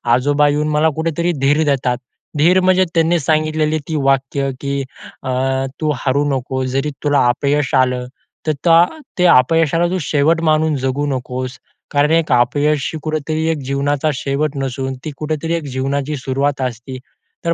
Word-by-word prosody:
आजोबा 145 +3 +2
येऊन 150 +1 0
मला 150 +1 +3
कुठेतरी 165 +2 -1
धीर 145 +3 +3
देतात. 130 -4 +1 0.4
धीर 175 +5 +4
म्हणजे 185 0 +4
त्यांनी 165 +1 +3
सांगितलेली 155 +1 +1
ती 160 - -3
वाक्य 135 0 +1
की 140 0 -2 0.4
अ, - - -4 0.5
"तू 155 -1 +1
हारू 140 +3 0
नकोस 130 -1 -2
जरी 135 +3 0
तुला 145 -2 +3
अपयश 140 +3 0
आलं 125 -1 +2 0.4
तर 165 +3 +4 0.3
ते 180 - +4
अपयशाला 165 +2 +4
तू 185 - 0
शेवट 155 +3 +1
म्हणून 155 -1 +2
जगू 135 +2 -1
नकोस. 130 -1 -4 0.3
कारण 145 +2 +2
एक 165 -3 +2
अपयश 145 +4 +2
कुठेतरी 155 0 -2
एक 160 - -2
जीवनाचा 140 +2 0
शेवट 140 +3 -2
नसून, 135 0 -3
ती 155 - -3
कुठेतरी 155 +2 -2
एक 165 - -3
जीवनाची 140 +3 -2
सुरुवात 135 +1 -1
असते." 125 +1 -4 0.5
तर 170 - +2
145 Hz, 150 wpm, -18 LUFS, 135-155 Hz, 0.5 s, धीर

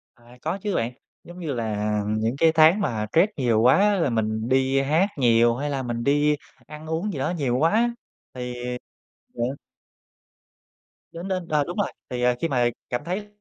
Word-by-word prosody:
À, 120 +1 -18
có 165 +5 -2
chứ 205 -1 -2
bạn. 115 +1 0 0.3
Giống 175 +1 -12
như 160 -5 -3
là 105 -3 -2
những 110 +3 0
cái 165 +2 +4
tháng 160 +4 +5
mà 110 - -1
stress 180 +6 +4
nhiều 120 -5 +2
quá 125 +3 +6
á 205 +1 +4
là 165 - +2
mình 110 0 -1
đi 135 +1 +2
hát 155 +8 +2
nhiều, 120 -2 +4
hay 145 +4 -3
là 135 -2 -2
mình 120 -1 -3
đi 145 +2 +2 0.3
ăn 155 +1 -10
uống 165 +6 -2
gì 140 - -4
đó - - 0
nhiều 135 -8 0
quá 160 +5 +3
á 235 +3 +2 0.4
thì 125 -1 -5 0.8
ờ. - - -8 1.7
Đến 170 +3 -7
đến, 185 -3 -3
ờ, 150 -3 +2
đúng 175 +7 -7
rồi, 205 - 0 0.2
thì, 125 -1 -3
à, 125 0 +3
khi 165 - +1
mà 125 -5 +2 0.2
cảm 120 - -2
thấy 195 +4 -3
140 Hz, 195 wpm, -24 LUFS, 120-165 Hz, 1.7 s, quá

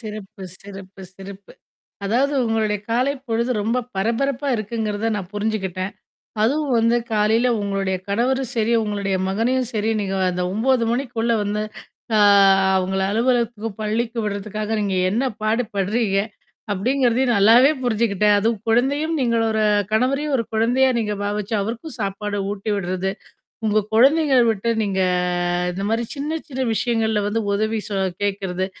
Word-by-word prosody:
சிறப்பு, 210 -3 -9 0.2
சிறப்பு, 195 -1 -11
சிறப்பு. 195 0 -11 0.5
அதாவது 260 +8 +1
உங்களோட 220 -2 0 0.2
காலைப் 260 +3 0
பொழுது 235 +2 0
ரொம்ப 230 +4 0 0.2
பரபரப்பா 255 +7 -1
இருக்குங்குறதை 215 0 -2
நான் 190 -3 -6
புரிஞ்சுக்கிட்டேன். 200 -3 -2 0.5
அதுவும் 280 +4 +1
வந்து 230 +1 +3 0.2
காலையில 220 +3 +2
உங்களோட 195 -1 -1 0.2
கணவரும் 255 +5 0
சரி, 225 +1 +1
உங்களோட 205 -2 -3 0.2
மகனையும் 245 +5 0
சரி 215 0 0
நீங்க 195 -1 -2 0.2
அந்த 180 0 -2
9:00 235 +3 +2
மணிக்குள்ள 240 -2 -1
வந்து 210 +1 -1 0.5
அ - - +4 0.6
அவங்களை 190 +1 0
அலுவலகத்துக்கும், 230 -2 0
பள்ளிக்கும் 225 +2 -1
விடுறதுக்காக 210 +1 -3
நீங்க 200 -2 -1 0.2
என்ன 230 +7 0 0.2
பாடு 220 +3 +1
பட்றீங்க, 200 +1 0 0.6
அப்படிங்கறதையும் 245 +4 +1
நல்லாவே 230 +8 +6
புரிஞ்சுக்கிட்டேன். 210 -3 +2
அதுவும் 225 +2 0
குழந்தையும் 280 +8 +1
நீங்க 235 -2 +1
ஒரு 220 0 0 0.3
கணவரையும் 275 +6 +1
ஒரு 230 - -1
குழந்தையா 240 +4 +3
நீங்க 210 -2 -1
பாவிச்சு, 205 +2 -2
அவருக்கும் 230 +9 -5
சாப்பாடு 205 +1 -3
ஊட்டி 205 +1 -4
விட்றது, 185 0 -2 0.6
உங்க 215 -1 +2
குழந்தைகளை 270 +2 +5
விட்டு 225 +2 -1
நீங்க 195 -2 -1 0.7
இந்த 195 +2 -4
மாரி 230 +1 0
சின்ன 300 +3 -2
சின்ன 265 -1 -2
விஷயங்கள்ல 220 -2 0
வந்து 225 +2 -1
உதவி 215 +2 0
சொ 205 - -4 0.3
கேக்குறது. 190 -2 -1
220 Hz, 135 wpm, -21 LUFS, 200-245 Hz, 0.7 s, நல்லாவே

